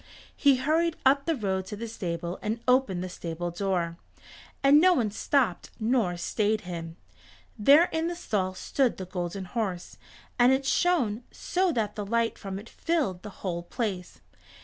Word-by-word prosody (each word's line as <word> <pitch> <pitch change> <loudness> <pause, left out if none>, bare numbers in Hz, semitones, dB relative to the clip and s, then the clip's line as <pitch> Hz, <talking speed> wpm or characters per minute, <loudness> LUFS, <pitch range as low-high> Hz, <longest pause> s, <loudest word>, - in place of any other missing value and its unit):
He 280 -2 +5
hurried 320 +5 +1
up 275 +2 +4
the 330 - +2
road 190 -5 -2
to 210 - -5
the 230 +3 -5
stable 175 -4 -4
and 220 +2 -2
opened 250 -8 +2
the - - -3
stable 175 -1 -5
door, 175 -2 -1 0.7
and 285 +2 +7
no 365 0 +6
one 225 -8 0
stopped 225 -3 0
nor 220 -6 +1
stayed 215 +4 0
him. 165 -2 -7 0.6
There 285 +10 +6
in 320 +1 0
the 345 - -3
stall 190 - -2
stood 255 +6 0
the 185 - -5
Golden 180 +1 -4
Horse, 190 -4 -4 0.4
and 245 +1 +6
it 265 +1 +1
shone 270 -10 +2
so 370 0 0
that 215 -4 -1
the 210 - -3
light 230 +2 0
from 195 -2 -5
it 205 +3 -9
filled 285 - -1
the 210 - -8 0.2
whole 170 -2 -1
place. 190 -1 -4
215 Hz, 170 wpm, -27 LUFS, 185-265 Hz, 0.7 s, and